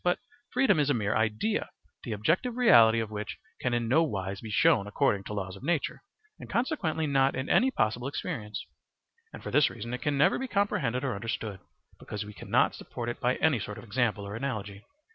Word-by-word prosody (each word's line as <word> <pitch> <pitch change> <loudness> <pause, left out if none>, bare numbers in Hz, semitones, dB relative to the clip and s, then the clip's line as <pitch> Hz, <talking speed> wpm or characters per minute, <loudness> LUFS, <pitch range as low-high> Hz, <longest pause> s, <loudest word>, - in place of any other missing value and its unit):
But 180 0 +2 0.3
freedom 250 - +3
is 145 -1 +2
a 145 - +3
mere 105 -2 0
idea, 110 - 0 0.3
the 120 - -5
objective 175 - 0
reality 115 - +6
of 110 -1 -5
which 105 0 -5 0.2
can 125 - -1
in 120 -1 0
no 140 +8 +4
wise 100 - -2
be 110 - -7
shown 110 -2 +3
according 105 -3 +1
to - - -5
laws 95 -2 -4
of 95 - -12
nature, 160 +2 -1 0.4
and - - -10
consequently 200 - 0
not 135 -2 +2
in 130 +1 -3
any 260 - +5
possible 120 - 0
experience; 135 - -4 0.7
and - - -10
for - - -5
this 150 - +5
reason 120 +1 -7
it 125 - -4
can 145 +3 0
never 145 - +4
be 265 - -3
comprehended 200 - 0
or 135 -3 0
understood, 105 -1 -4 0.4
because 105 0 -5
we 105 - -9
cannot - - +1
support 120 -1 -6
it 120 - -5
by 125 +1 +1
any 145 -6 +2
sort 105 0 -6
of - - -9
example 110 -2 0
or 100 +1 -6
analogy. 105 -5 -4
120 Hz, 205 wpm, -29 LUFS, 105-150 Hz, 0.7 s, reality